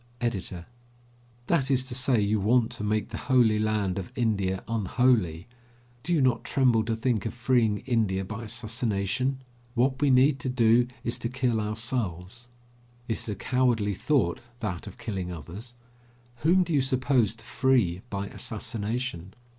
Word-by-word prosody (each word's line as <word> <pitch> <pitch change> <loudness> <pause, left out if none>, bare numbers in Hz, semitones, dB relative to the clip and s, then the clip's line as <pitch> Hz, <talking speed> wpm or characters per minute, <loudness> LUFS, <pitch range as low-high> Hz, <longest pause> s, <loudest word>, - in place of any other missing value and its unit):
EDITOR: 95 -7 -3 0.8
That 140 -4 +1
is 130 -1 +2
to 125 - -5
say, 125 -1 +2
you 105 +1 +1
want 115 +4 +3
to 115 -3 -5
make 105 0 0
the 110 - -5
holy 120 -5 +4
land 105 -3 0
of 95 - -7
India 100 -6 0
unholy. 110 -6 +1 0.6
Do 165 - -4
you 165 -4 +3
not 120 -3 +2
tremble 125 -5 +3
to 115 0 0
think 115 -2 0
of - - -6
freeing 120 -4 +1
India 105 -7 +1
by 110 +4 -6
assassination? 115 +2 -1 0.3
What 130 +3 +1
we 145 - +4
need 135 +2 +4
to 130 - -3
do 120 -1 +4 0.2
is 115 - -2
to 120 - -3
kill 125 -3 0
ourselves. 105 -1 -3 0.6
It 110 - -1
is - - -5
a 105 - -2
cowardly 115 -2 +1
thought, 100 - +1 0.2
that 95 -7 -4
of - - -10
killing 95 -5 -4
others. 90 - -8 0.6
Whom 175 +8 +4
do 170 -2 -3
you 140 - +4
suppose 130 -4 +1
to 115 - -14
free 115 -11 +2
by 100 -1 -3
assassination? 105 -3 -4
115 Hz, 160 wpm, -27 LUFS, 100-130 Hz, 0.8 s, holy